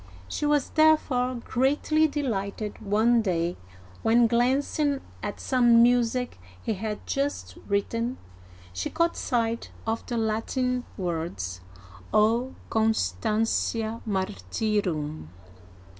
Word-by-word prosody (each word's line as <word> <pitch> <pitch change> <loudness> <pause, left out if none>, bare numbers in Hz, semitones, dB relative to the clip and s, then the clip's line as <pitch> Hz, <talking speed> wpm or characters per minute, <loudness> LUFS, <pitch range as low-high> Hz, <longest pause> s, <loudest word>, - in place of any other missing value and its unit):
She 295 - -2
was 295 -2 +2
therefore 260 -6 +3
greatly 295 +5 +2
delighted 215 -8 -3
one 220 +3 +3
day 175 -4 0 0.5
when, 235 +2 +4
glancing 270 +4 +1 0.2
at - - -4
some 240 -3 +5
music 245 - +2 0.2
he 220 - -2
had 210 +1 -4
just 275 - -2
written, 230 +5 -1 0.6
she 90 0 -3
caught 335 0 +1
sight 230 -2 -1 0.2
of 225 0 -1
the 240 - -2
Latin 245 +3 -1
words, 160 - -3 0.3
" 90 0 -19
O 230 +5 +2 0.2
Constantia 220 - 0
Martyrum." 165 - -2
225 Hz, 100 wpm, -26 LUFS, 195-250 Hz, 0.6 s, some